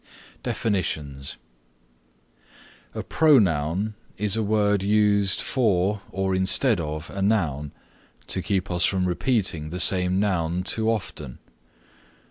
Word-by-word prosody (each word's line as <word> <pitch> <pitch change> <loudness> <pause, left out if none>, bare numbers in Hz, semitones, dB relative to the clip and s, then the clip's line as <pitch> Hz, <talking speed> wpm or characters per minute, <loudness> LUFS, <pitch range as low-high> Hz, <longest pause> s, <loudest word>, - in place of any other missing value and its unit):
DEFINITIONS 75 -10 -2 1.6
A - - -4
Pronoun 100 - +2 0.2
is 105 0 0
a 110 - 0
word 105 -1 +1
used 100 -1 +2
for 105 -4 +1
or 95 0 -1
instead 95 +4 +2
of 75 0 -5
a 100 - -5
noun 80 -9 0 0.5
to 95 - -1
keep 95 -1 -1
us 90 0 +1
from 95 -1 +1
repeating 90 - -1
the 90 +3 -5
same 90 0 +2
noun 90 -3 0
too 110 +3 0
often. 95 - -4
95 Hz, 110 wpm, -24 LUFS, 85-105 Hz, 1.6 s, Pronoun